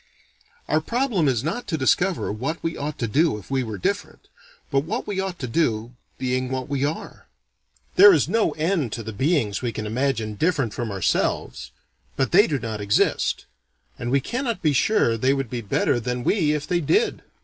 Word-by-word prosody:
"Our 155 +2 +2
problem 230 - 0
is 125 -3 +1
not 170 +11 -3
to 160 - -1
discover 175 - +1
what 135 +10 -4
we 165 0 -2
ought 145 +1 -4
to 115 - -2
do 150 +2 +2
if 105 +4 -12
we 135 -1 +1
were 110 -4 -4
different, 90 - -3 0.4
but 135 - +3
what 150 +4 -3
we 200 -2 -3
ought 190 -2 -3
to 135 - -4
do, 115 -3 0 0.2
being 130 0 -1
what 130 -1 -3
we 140 -1 -1
are. 150 +3 -4 0.7
There 405 +1 +10
is - - +3
no 225 -1 +2
end 160 - 0
to 115 - -4
the 110 +1 -6
beings 130 - 0
we 120 -2 -1
can 110 - -5
imagine 115 -1 -1
different 140 - 0
from 120 -2 -3
ourselves; 95 -3 -1 0.5
but 135 - 0
they 205 +5 +6
do 145 - 0
not 110 -4 -5
exist," 100 0 +1 0.5
and 120 - -3
we 135 +2 +2
cannot 235 - -3
be 155 -2 +3
sure 125 - +2
they 130 +4 +2
would 135 -4 -3
be 120 -2 -3
better 105 +3 +1
than 125 +1 -3
we 155 - +2
if 150 -1 -2
they 175 +1 0
did. 425 - +1
135 Hz, 195 wpm, -23 LUFS, 115-165 Hz, 0.7 s, There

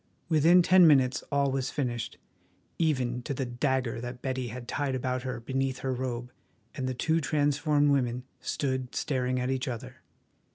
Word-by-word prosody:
Within 165 +3 +6
ten 185 -1 +7
minutes 130 -4 +4
all 140 -1 +2
was 135 -1 -1
finished, 120 -5 -3 0.6
even 130 -7 +1
to 135 +3 -4
the 130 - -2
dagger 125 -1 -1
that 125 0 -6
Betty 130 -2 -2
had 120 +1 -7
tied 140 0 -1
about 130 0 -1
her 125 -1 -4
beneath 130 +2 -2
her 130 - 0
robe, 125 -1 -4 0.4
and 130 -3 -3
the 130 - -3
two 160 +6 +1
transformed 145 0 +2
women 125 -3 0 0.2
stood 130 -3 -2
staring 130 -2 0
at 125 +1 -1
each 130 0 -2
other. 120 - -6
130 Hz, 165 wpm, -29 LUFS, 125-145 Hz, 0.6 s, ten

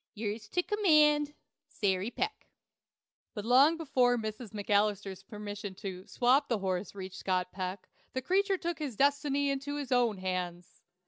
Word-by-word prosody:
"yours 215 0 -4
to 355 +11 0
Command, 300 -8 +4 0.3
SARY 200 -7 0
PECK." 415 - -3 0.9
But 210 -1 -5
long 275 +7 +6
before 255 -6 +2
Mrs. 220 +1 -5
McAlister's 205 -2 0
permission 205 0 -7
to 190 -2 -7
"swap" 255 +4 +3
the 235 - +2
horse 190 0 -2
reached 190 -1 -7
Scott 185 -1 -1
Peck, 185 0 -5 0.3
the 260 - -1
creature 390 +4 +2
took 345 -1 -3
his 285 -7 -4
destiny 280 +1 +2
into 280 +1 -3
his 285 -3 -5
own 240 -4 +3
hands. 180 -2 -4
225 Hz, 145 wpm, -31 LUFS, 195-285 Hz, 0.9 s, long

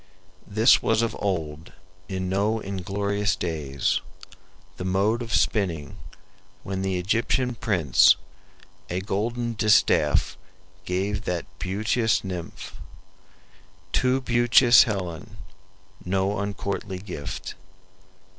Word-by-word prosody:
This 110 +4 +5
was 115 0 +2
of 115 - -2
old, 80 -5 -3 0.4
in 95 -1 -3
no 100 +4 0
inglorious 100 +1 -2
days, 75 -6 -1 0.8
The - - -5
mode 100 +5 +1
of 115 -1 -6
spinning, 85 - 0 0.7
when 95 -1 -4
the 95 -1 -1
Egyptian 115 +6 0
prince 90 - +4 0.7
A 90 +2 -2
golden 115 +5 -2
distaff 105 -1 +2 0.5
gave 100 +3 -2
that 90 -2 -2
beauteous 110 +4 0
nymph, 90 -3 -7 1.2
Too 130 +1 +2
beauteous 120 0 +5
Helen; 90 -8 -5 0.7
no 95 +2 0
uncourtly 100 -1 -4
gift." 90 -7 -6
100 Hz, 95 wpm, -25 LUFS, 90-110 Hz, 1.2 s, This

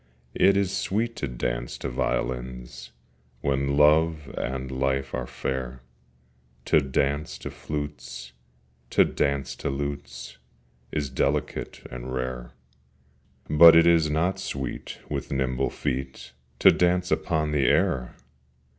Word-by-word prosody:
It 100 0 +4
is 100 -1 0
sweet 115 +5 -1
to 70 - -2
dance - - -3
to - - -4
violins 60 0 -3 0.5
When 70 0 0
Love 75 0 +3
and 65 0 -3
Life 65 +1 -1
are 60 -2 -3
fair: 65 -1 -4 0.8
To - - +5
dance 70 +2 -1
to - - -7
flutes, 70 -4 -6 0.6
to - - +5
dance 70 -1 -1
to - - -3
lutes 70 +1 -5 0.5
Is 70 -3 -2
delicate 65 - -2
and 60 +1 -6
rare: 65 -1 -4 1.0
But 80 +2 +9
it 85 0 +7
is 85 -2 +4
not 85 +5 0
sweet 70 -2 -5
with - - -4
nimble 65 -1 0
feet 65 0 -4 0.3
To - - +7
dance 90 +1 +1
upon 75 -3 0
the 70 -4 +2
air! 60 0 +1
70 Hz, 120 wpm, -26 LUFS, 65-75 Hz, 1.0 s, But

